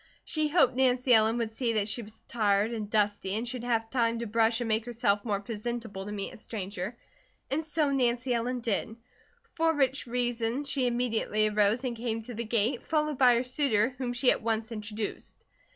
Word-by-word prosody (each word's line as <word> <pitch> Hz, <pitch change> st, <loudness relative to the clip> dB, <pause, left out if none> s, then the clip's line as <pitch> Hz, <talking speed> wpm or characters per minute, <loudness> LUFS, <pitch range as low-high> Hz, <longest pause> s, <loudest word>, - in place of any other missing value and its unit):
She 310 Hz, -1 st, 0 dB
hoped 295 Hz, -4 st, +4 dB
Nancy 255 Hz, -1 st, +3 dB
Ellen 220 Hz, +1 st, +4 dB
would 230 Hz, -2 st, -2 dB
see 230 Hz, +1 st, -1 dB
that 210 Hz, -2 st, +1 dB
she 220 Hz, +3 st, 0 dB
was 215 Hz, 0 st, -12 dB
tired 210 Hz, -1 st, +1 dB
and 215 Hz, -3 st, -4 dB
dusty, 205 Hz, -2 st, 0 dB
and 230 Hz, +3 st, -2 dB
should 245 Hz, 0 st, -4 dB
have 225 Hz, -2 st, -1 dB
time 235 Hz, -3 st, +1 dB
to 235 Hz, -, -3 dB
brush 225 Hz, +1 st, +2 dB
and 240 Hz, -, -2 dB
make 220 Hz, +1 st, 0 dB
herself 230 Hz, -4 st, 0 dB
more 205 Hz, -4 st, -1 dB
presentable 215 Hz, -1 st, -5 dB
to -, -, -5 dB
meet 200 Hz, -1 st, -4 dB
a -, -, -11 dB
stranger, 205 Hz, 0 st, -5 dB, 0.5 s
and 305 Hz, +4 st, 0 dB
so 305 Hz, -2 st, 0 dB
Nancy 250 Hz, -1 st, +1 dB
Ellen 245 Hz, +1 st, -1 dB
did; 225 Hz, -1 st, -1 dB, 0.6 s
for 325 Hz, 0 st, +1 dB
which 270 Hz, -2 st, +1 dB
reason 240 Hz, +1 st, -1 dB
she 270 Hz, -3 st, +1 dB
immediately 230 Hz, -3 st, +1 dB
arose 210 Hz, +3 st, +2 dB
and 250 Hz, -2 st, -2 dB
came 225 Hz, -1 st, -3 dB
to 245 Hz, +2 st, -8 dB
the 235 Hz, +1 st, -4 dB
gate, 230 Hz, +2 st, 0 dB
followed 305 Hz, -3 st, 0 dB
by 250 Hz, -2 st, +6 dB
her 235 Hz, -, +1 dB
suitor 250 Hz, -4 st, +2 dB
whom 250 Hz, -2 st, -2 dB
she 245 Hz, +1 st, +3 dB
at -, -, -1 dB
once 225 Hz, 0 st, -1 dB
introduced. 210 Hz, -1 st, -6 dB
235 Hz, 200 wpm, -29 LUFS, 215-250 Hz, 0.6 s, by